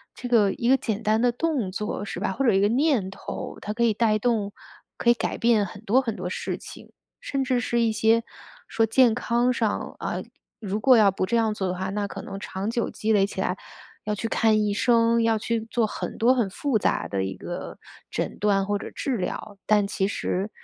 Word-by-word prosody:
这 250 - -6
个 210 -5 +4
一 235 - -1
个 265 - +6
简 225 -3 -3
单 215 +1 +2
的 245 -1 +3
动 270 - -1
作 205 +1 -4
是 200 - -6
吧， - - 0
或 270 +8 -1
者 230 - +4
一 195 - +3
个 205 - +3
念 250 -5 +2
头， 190 - -7
它 210 - -4
可 235 - 0
以 230 -2 +3
带 215 0 +2
动， 215 -3 0 0.4
可 235 - +1
以 - - +8
改 240 - -3
变 230 -3 +3
很 200 +2 -10
多 225 +4 +3
很 230 -5 -3
多 180 -1 -4
事 - - -3
情。 - - -12 0.3
甚 275 - -2
至 255 -2 +1
是 240 -1 0
一 230 -1 +2
些， 225 +1 +3 0.5
说 225 0 +2
健 235 +1 +4
康 240 +1 +1
上 225 -4 -2
啊， - - -3 0.4
如 205 0 -2
果 260 +3 +6
要 210 -4 +6
不 185 - -1
这 205 - -1
样 225 -2 +2
做 195 -3 -2
的 180 - -1
话， 190 +1 -3
那 205 +1 -2
可 - - -7
能 195 0 -7
长 195 +1 -4
久 235 0 -1
积 220 - -2
累 200 -2 +4
起 190 - -4
来， 185 0 -1 0.5
要 210 0 -1
去 225 +3 -3
看 220 -1 +3
医 205 -1 0
生， 230 +1 +3
要 225 -1 +2
去 230 +2 -1
做 235 -1 +1
很 215 - -5
多 240 +3 +4
很 235 -6 0
复 235 +4 0
杂 - - 0
的 95 -1 -1
一 95 0 -4
个， - - -7 0.3
诊 - - -3
断 200 -2 +2
或 205 +1 0
者 - - -7
治 265 -4 -2
疗。 200 +2 -5
但 210 -1 +3
其 195 -1 -1
实 195 0 -2
220 Hz, 245 characters per minute, -25 LUFS, 200-235 Hz, 0.5 s, 以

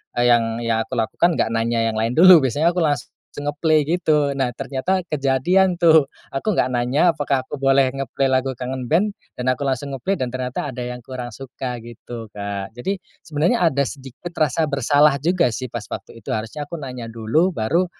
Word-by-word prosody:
eee, 120 0 +3
yang 115 0 +2
yang 115 -1 +1
aku - - -10
lakukan 165 +9 +1
enggak - - +1
nanya 115 0 0
yang 110 - -5
lain 115 +2 0
dulu 180 +1 +9
biasanya 150 +7 +2
aku 180 - -2
las 145 -5 -1 0.2
langsung 145 - -8
nge-play 155 +2 +2
gitu. 150 -4 +1
Nah 135 -2 0
ternyata 175 +8 -1
kejadian 160 +6 +2
tuh, 160 -4 +5 0.2
aku 135 +11 -2
enggak 130 -10 +1
nanya 130 +8 +2
apakah 140 -4 -1
aku 140 - -7
boleh 135 -1 +3
nge-play 135 0 -2
lagu 130 -1 0
Kangen 125 -1 -4
Band, 200 +6 +2 0.2
dan 125 - -4
aku 130 - -10
langsung 135 +2 -3
nge-play 190 +10 -1
dan 125 -1 -3
ternyata, 125 +1 -3
ada 125 - -6
yang 125 0 -4
kurang 125 -2 -6
suka 125 +1 -6
gitu 120 0 -9
Kak. 100 0 -5
Jadi 190 +12 -3 0.2
sebenarnya 160 +9 0
ada 140 -1 0
sedikit 135 +6 -8
rasa 155 0 +1
bersalah 145 0 +3
juga 170 -7 +2
sih 130 +1 -4
pas 115 -3 -6
waktu - - -8
itu. - - -2
Harusnya 115 +7 -4
aku 155 +1 -7
nanya 125 -3 -6
dulu 115 +11 0
baru, 165 +10 +1
135 Hz, 195 wpm, -21 LUFS, 120-155 Hz, 0.2 s, dulu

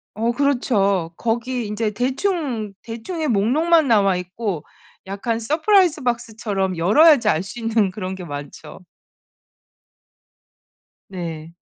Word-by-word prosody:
어 230 +3 0
그렇죠. 200 -11 +1
거기 235 +3 -2
인제 210 +1 -2
대충, 255 - -2
대충의 285 +7 -4
목록만 290 +9 +3
나와 200 -5 +3
있고 180 -2 -4 0.4
약간 225 +4 -2
서프라이즈 320 - +2
박스처럼 215 -6 -2
열어야지 275 - +5
알 155 - +2
수 220 +5 -9
있는 225 -4 +1
그런 185 -1 -5
게 185 -1 -8
많죠. 145 +2 -9 2.3
네. 165 -3 -7
225 Hz, 230 characters per minute, -21 LUFS, 190-260 Hz, 2.3 s, 열어야지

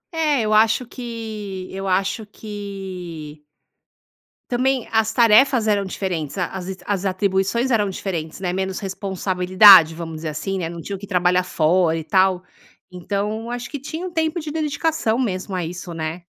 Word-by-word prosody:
É, 300 -5 +2
eu 215 0 0
acho 225 +3 +4
que 220 -6 -7
eu 195 0 -4
acho 195 +4 0
que 185 -8 -8 1.1
também 255 0 0
as 220 0 +2
tarefas 235 +1 +5
eram 200 -2 +2
diferentes, 180 -5 -4
a 180 - 0
as 190 -1 -7 0.2
as 200 -1 -2
atribuições 195 +6 0
eram 210 -3 +2
diferentes, 170 -4 -5
né, 180 -2 -2
menos 190 0 -2
responsabilidade, 185 -2 +5
vamos 165 -1 -6
dizer 155 0 -4
assim, 170 +6 -3
né, 165 - -3
não 170 0 -7
tinham 195 +1 -6
que 200 - -9
trabalhar 180 -1 +2
fora 165 -1 +2
e 160 - -4
tal, 185 +3 +2 0.5
então 205 +5 -3
acho 245 0 -5
que 285 - -5
tinha 320 +6 -6
um 365 - -5
tempo 320 +1 -1
de 300 -1 -6
dedicação 305 -6 0
mesmo 190 -5 -2
a 175 -2 -2
isso, 175 +1 -7
né. 165 +2 -5
195 Hz, 160 wpm, -21 LUFS, 180-225 Hz, 1.1 s, tarefas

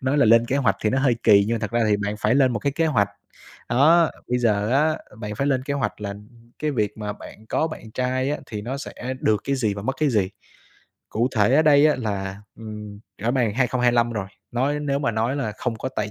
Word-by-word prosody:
nói 130 +3 0
là 140 - +5
lên 115 +1 +5
kế 135 - 0
hoạch 110 -9 +2
thì 110 - +2
nó 130 - +1
hơi 135 -3 +2
kỳ 100 -2 +6
nhưng 115 - 0
mà - - -1
thật 105 -2 -4
ra 115 0 +1
thì 105 - +3
bạn 105 0 -3
phải 105 +3 +2
lên 130 -2 +4
một 115 - -1
cái 140 +7 -1
kế 165 +3 +1
hoạch. 105 -10 +2 0.6
Đó, 155 +7 +5 0.2
bây 125 - +1
giờ 105 -3 +1
á, 155 +4 +2 0.2
bạn 105 -1 -5
phải 140 +6 -1
lên 130 -2 +1
kế 140 +1 -3
hoạch 140 -5 -2
là 100 -1 -4 0.4
cái 155 - -1
việc 105 -6 -1
mà 105 -1 -3
bạn 110 +1 -13
có 160 - 0
bạn 155 -8 -8
trai 130 +3 -1
á 150 - -2
thì 105 -2 -6
nó 125 +5 -4
sẽ - - -7 0.3
được 105 -2 +2
cái 140 0 0
gì 110 -6 0
và 100 - -6
mất 135 +5 -2
cái 155 - +3
gì. 105 -6 +1 0.8
Cụ 120 +4 +1
thể 105 +4 +4
ở 155 - +5
đây 150 -1 +6
á 150 - +2
là, 100 -4 -4 0.2
ừm, 105 -2 -8 0.2
rõ 115 - +1
bàng 120 -5 +1
2025 120 -1 +2
rồi, 105 -3 -3 0.3
nói 140 +5 0
nếu 140 -1 -1
mà 140 - 0
nói 115 +4 -1
là 130 -7 -2
không 120 -3 -2
có 130 - -4
tài 105 0 -1
120 Hz, 255 wpm, -23 LUFS, 105-135 Hz, 0.8 s, kỳ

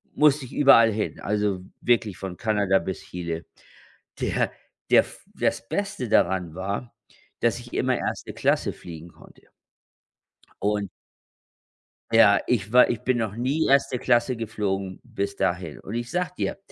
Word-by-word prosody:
musste 150 -2 +4
ich - - -12
überall 115 -5 +6
hin, 105 - -3
also, 105 -2 -1 0.2
wirklich 115 -5 +1
von 95 -2 -6
Kanada 105 -4 +2
bis 95 +2 -5
Chile. 85 -2 -5 0.7
Der - - 0 0.4
der - - +7 0.3
das 115 - -1
Beste 195 - -3
daran 90 -5 +2
war, 100 +6 -4 0.5
dass 120 0 +1
ich 120 0 -13
immer 130 -1 +1
1. - - -4
Klasse - - +1
fliegen 85 -1 -10
konnte. - - -19 1.1
Und 105 -1 0 1.2
Ja, 110 -3 +6
ich 110 -4 0
war 125 +1 +6
ich 120 - -2
bin 130 -1 +1
noch 110 -3 -2
nie 135 +7 0
1. 135 -2 +3
Klasse 120 0 +2
geflogen 100 -4 -3
bis 100 0 -4
dahin. 85 -5 -2
Und 110 - -7
ich 120 0 -4
sage 180 +1 -1
dir, - - -2
110 Hz, 145 wpm, -25 LUFS, 95-120 Hz, 1.2 s, der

